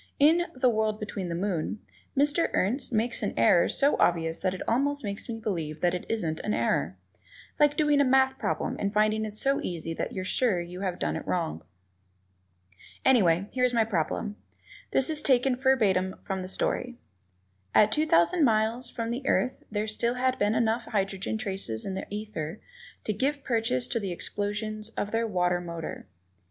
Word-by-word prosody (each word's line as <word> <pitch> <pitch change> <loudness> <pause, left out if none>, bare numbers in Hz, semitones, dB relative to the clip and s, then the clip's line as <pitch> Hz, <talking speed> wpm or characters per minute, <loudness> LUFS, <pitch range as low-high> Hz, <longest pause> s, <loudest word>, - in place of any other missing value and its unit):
In 330 +5 +4
"The 255 0 +2
World 215 -2 +1
Behind 200 -4 -4
the 170 - -2
Moon," 185 0 -2 0.4
Mr. 290 +4 +3
Ernst 245 +8 0
makes 235 +1 0
an 205 - -2
error 115 +9 +5
so 280 +1 +3
obvious 165 -1 +2
that 185 -1 0
it - - -7
almost 285 +4 +1
makes 200 +3 -5
me 230 - -3
believe 165 -8 -3
that 175 -1 +2
it 180 - -4
isn't 165 -8 -1
an 210 - -1
error. - - 0 0.6
Like 295 0 +4
doing 295 -2 +4
a - - +6
math 265 0 +3
problem - - -2
and 200 - 0
finding 215 +1 +2
it 210 -1 -7
so 275 +5 +1
easy 165 -2 -4
that - - -3
you're 185 - -4
sure 230 +2 +2
that 175 -1 -3
you 180 +1 -7
have 185 -3 -1
it 75 +1 -2
wrong. 80 +1 -2 1.4
Anyway, 195 -8 +4
here 255 - -1
is 250 -1 +2
my 230 - +4
problem; 205 +1 -2 0.5
this 265 - +3
is 310 -1 +1
taken 260 -1 +3
verbatim 210 -8 +2
from 190 -1 -3
the 185 - -5
story: 245 +5 -2 0.8
"At 210 0 +6
two 310 +6 +1
thousand 305 - +4
miles 230 +1 +2
from 230 0 -4
the 245 +3 -3
Earth 255 - +1
there 210 0 -1
had 215 - -3
still 235 +2 0 0.2
been 205 +2 +2
enough 230 +1 +1
hydrogen 195 +1 -2
traces 190 - -2
in 195 - -3
the 190 - -5
ether 205 -4 -5 0.4
to 215 - -1
give 280 +6 -1
purchase 225 - 0
to 230 - 0
the 195 -4 -3
explosions 210 +4 -4
of 205 - -2
their 230 0 0
water 180 -3 +1
motor." 170 -9 -6
215 Hz, 185 wpm, -28 LUFS, 185-250 Hz, 1.4 s, a